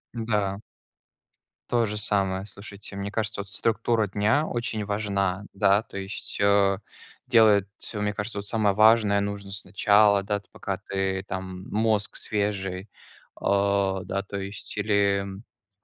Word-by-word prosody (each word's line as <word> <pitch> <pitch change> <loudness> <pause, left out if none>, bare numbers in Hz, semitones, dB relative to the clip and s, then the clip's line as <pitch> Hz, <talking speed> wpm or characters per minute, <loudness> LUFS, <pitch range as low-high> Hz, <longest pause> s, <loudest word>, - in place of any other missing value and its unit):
Н-да. 105 -4 -1 1.1
То 120 -1 +3
же 105 0 -3
самое. 100 -2 0
Слушайте, 100 0 -8
мне 100 +1 -4
кажется, 110 -1 -2
вот 100 - -11
структура 115 0 +1
дня 105 +10 +1
очень 115 -3 -2
важна, 100 -2 -1
да, 100 +2 +3
то 100 - -10
есть, 95 +1 -6
э, 100 -1 +4 0.5
делать, 110 -5 +5 0.3
э, 105 - -3
мне 105 0 0
кажется, 105 +1 -3
вот 100 - -6
самое 105 -3 +2
важное 110 -1 +5
нужно 100 -1 -4
сначала, 100 +1 +3
да, 105 +1 -1
ты, 100 - -26
пока 100 -1 -4
ты 95 0 -2
там, 95 0 -6
мозг 110 -1 +1
свежий, 100 -2 -2 0.5
а, 100 -1 +1
да. 100 +1 -3
То 100 0 -6
есть 100 0 -6
или, 100 -1 +2 0.6
как - - -60
100 Hz, 145 wpm, -26 LUFS, 100-105 Hz, 1.1 s, делать